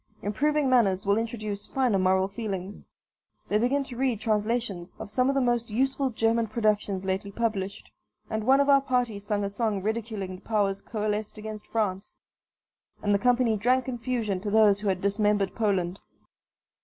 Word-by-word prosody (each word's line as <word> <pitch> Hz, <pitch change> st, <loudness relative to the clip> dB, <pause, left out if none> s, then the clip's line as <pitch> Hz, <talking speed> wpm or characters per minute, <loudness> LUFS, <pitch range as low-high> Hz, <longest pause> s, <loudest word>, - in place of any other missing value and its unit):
Improving 295 Hz, +8 st, +1 dB
manners 205 Hz, -7 st, +3 dB
will 200 Hz, +2 st, +3 dB
introduce 215 Hz, -3 st, -4 dB
finer 250 Hz, -7 st, +1 dB
moral 190 Hz, 0 st, +3 dB
feelings. 200 Hz, -2 st, -5 dB, 0.6 s
They 210 Hz, -, +2 dB
begin 270 Hz, +5 st, +1 dB
to 260 Hz, -2 st, -9 dB
read 250 Hz, -3 st, 0 dB
translations 215 Hz, -4 st, -1 dB
of -, -, -8 dB
some 255 Hz, +4 st, +2 dB
of 275 Hz, -, +1 dB
the 275 Hz, -, +3 dB
most 240 Hz, -2 st, 0 dB
useful 265 Hz, +4 st, 0 dB
German 225 Hz, 0 st, +1 dB
productions 210 Hz, -3 st, 0 dB
lately 190 Hz, +1 st, -2 dB
published, 200 Hz, -3 st, -3 dB, 0.4 s
and 220 Hz, -1 st, -2 dB
one 265 Hz, +4 st, +5 dB
of 280 Hz, -, +3 dB
our 275 Hz, -1 st, +6 dB
party 250 Hz, -6 st, 0 dB
sung 205 Hz, 0 st, -2 dB
a -, -, 0 dB
song 205 Hz, -2 st, -1 dB
ridiculing 215 Hz, -4 st, -3 dB
the -, -, -18 dB
powers 200 Hz, -3 st, 0 dB
coalesced 215 Hz, -1 st, -3 dB
against 215 Hz, 0 st, -7 dB
France, 205 Hz, -3 st, -2 dB, 0.9 s
and 205 Hz, -1 st, +2 dB
the 200 Hz, -, +3 dB
company 245 Hz, -1 st, +3 dB
drank 250 Hz, +4 st, +2 dB
confusion 235 Hz, -5 st, -2 dB
to 205 Hz, +2 st, -4 dB
those 210 Hz, -1 st, +5 dB
who 210 Hz, -, -4 dB
had 185 Hz, -2 st, 0 dB
dismembered 200 Hz, -1 st, +1 dB
Poland. 195 Hz, -5 st, 0 dB
215 Hz, 170 wpm, -27 LUFS, 200-240 Hz, 0.9 s, our